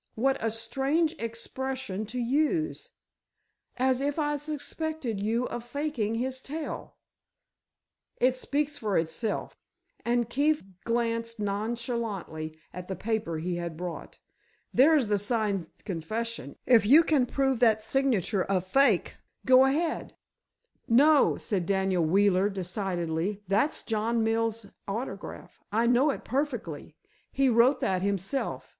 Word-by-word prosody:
"What 265 +4 +2
a 225 - +2
strange 270 +9 0
expression 230 -2 -4
to 245 +4 -6
use. 300 +7 0 0.9
As 260 0 +2
if 285 +2 -1
I 295 -1 +1
suspected 300 -4 -4
you 225 +4 0
of 240 - -5
faking 245 -4 -2
his 260 +2 -2
tale." 305 +3 -6 1.2
"It 255 +1 +3
speaks 290 +3 -1
for 210 -3 0
itself," 165 +7 -2 0.4
and 240 -1 +1
Keefe 295 +5 +1 0.2
glanced 230 -1 -1
nonchalantly 205 -6 -3 0.2
at 180 0 -7
the 190 - -3
paper 220 -7 -2
he 175 +2 -2
had 170 -2 -5
brought. 175 0 -6 0.6
"There's 285 0 +5
the 205 -1 +1
signed 205 -5 -1 0.2
confession—if 215 - 0
you 285 +10 +7
can 285 -6 +2
prove 270 -1 +1
that 220 -3 +4
signature 225 -6 +1
a 195 -1 +3
fake—go 255 +5 +3
ahead." 315 +5 -1 0.7
"No," 285 +5 +5
said 185 -5 -2
Daniel 190 -3 +1
Wheeler, 195 +3 +3
decidedly; 185 -1 -2
"that's 210 +11 +1
John 225 +1 0
Mills' 225 0 0 0.2
autograph. 205 -1 -6
I 225 +3 +2
know 245 +5 +4
it 275 - -3
perfectly. 245 - -3 0.4
He 270 -1 +2
wrote 240 +4 +4
that 185 -1 +1
himself. 200 +6 -2
230 Hz, 120 wpm, -28 LUFS, 200-265 Hz, 1.2 s, you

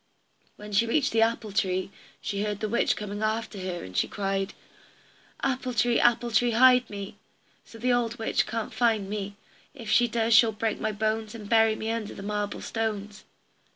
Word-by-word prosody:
When 210 0 -10
she 220 +3 +3
reached 280 +4 +1
the 225 - +2
apple 225 -2 +1
tree, 190 -2 0 0.3
she 200 -1 -3
heard 210 -1 -2
the 215 - -2
witch 235 +3 +1
coming 205 0 -5
after 220 -1 -2
her, 185 -2 -4
and 95 0 -10
she - - +2
cried: 195 -1 -2 0.9
"Apple 255 -2 -1
tree, 235 +1 +3
apple 240 0 +3
tree, 235 +1 +3
hide 250 0 +6
me, 200 -1 -7 0.5
So 230 - -13
the 245 +2 +1
old 240 -1 0
witch 225 - 0
can't 225 0 -4
find 225 -5 +1
me; 200 0 -4 0.4
If 230 -5 -6
she 240 0 +5
does 230 0 +1
she'll 220 0 +6
break 215 +1 -2
my 215 - -1
bones, 215 +1 -2
And 210 -3 -8
bury 225 0 +4
me 220 +1 -3
under 225 -2 -4
the 195 - -8
marble 205 0 -3
stones." 210 -2 -4
220 Hz, 190 wpm, -27 LUFS, 205-230 Hz, 0.9 s, hide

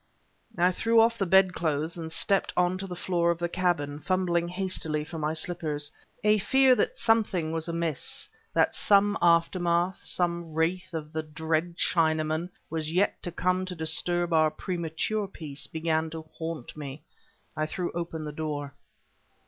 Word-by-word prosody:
I 175 +1 +4
threw 230 +5 +3
off 230 +1 +4
the 195 - +1
bedclothes 170 -4 +2
and 165 -2 -6
stepped 195 +4 +2
on 180 +1 +2
to 195 - -5
the 180 - -6
floor 175 -1 0
of 170 - +1
the 175 +1 -1
cabin, 170 -5 -1
fumbling 175 0 0
hastily 180 -4 -1
for 160 +1 -7
my 155 +1 0
slippers. 155 -3 -2 0.3
A 210 0 +4
fear 265 +5 +5
that - - 0
something 210 -8 +2
was 160 0 -2
amiss, 165 -4 -2 0.2
that - - +2
some 205 0 +4
aftermath, 170 +1 +2
some 170 -2 -1
wraith 170 +2 -1
of 155 -1 -5
the 160 - -1
dread 160 +2 -2
Chinaman, 160 0 +1 0.2
was 160 -1 -3
yet 185 +4 +1
to 175 - -4
come 180 +2 0
to 185 -1 -5
disturb 170 +2 +1
our 155 -1 +5
premature 175 +5 -2
peace, 150 -6 -3
began 160 0 -1
to 160 0 -7
haunt 160 -6 -5
me. 145 -1 -7 0.5
I 155 0 -1
threw 175 +2 -3
open 170 -2 -4
the 150 - -4
door. 145 -2 -4
170 Hz, 160 wpm, -28 LUFS, 155-185 Hz, 0.5 s, fear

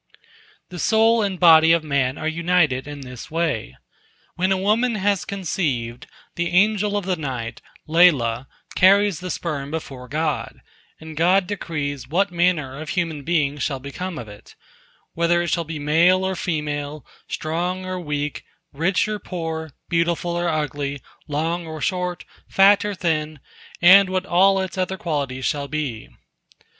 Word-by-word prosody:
The 180 - -8
soul 225 +4 +3
and 195 -3 -2
body 160 -2 +7
of 170 -1 +2
man 140 -3 0
are - - -3
united 160 -5 +1
in 145 -1 -7
this 125 -2 -9
way: 150 - -2 0.6
When 185 +2 0
a 190 - +3
woman 220 +5 +1
has 200 -2 0
conceived, 145 -11 -3 0.3
the 170 0 -2
Angel 205 +2 +2
of 200 - -3
the 185 -1 0
Night, 130 -7 -5 0.3
Lailah, 135 -8 +3 0.3
carries 195 -2 +4
the 185 - -6
sperm 150 -5 -3
before 135 -5 -6
God, 155 +3 -2 0.4
and 160 0 -10
God 180 +4 +3
decrees 150 -8 -4
what 180 +5 +1
manner 165 -6 0
of 155 - -7
human 165 -5 -2
being 150 -2 0
shall 135 0 -1
become 160 +6 -6
of 120 - -7
it—whether 170 +10 -4
it 170 - -2
shall 170 -1 0
be 160 0 -5
male 165 +6 +3
or 190 0 -1
female, 150 -3 -3 0.2
strong 175 +4 -3
or 185 0 -4
weak, 150 -3 -3 0.3
rich 170 +9 +1
or 215 -1 -3
poor, 160 -4 -5 0.2
beautiful 170 0 0
or 175 0 -1
ugly, 145 -2 -2 0.3
long 165 +3 -2
or 160 -1 -6
short, 180 +3 -2 0.2
fat 200 +1 +5
or 205 -1 -3
thin, 155 -4 -2 0.4
and 190 +2 +8
what 185 0 -1
all 195 +2 +4
its 190 0 -4
other 185 +1 -1
qualities 140 -7 -3
shall 140 -1 -1
be. 140 -6 -4
165 Hz, 150 wpm, -22 LUFS, 145-185 Hz, 0.6 s, and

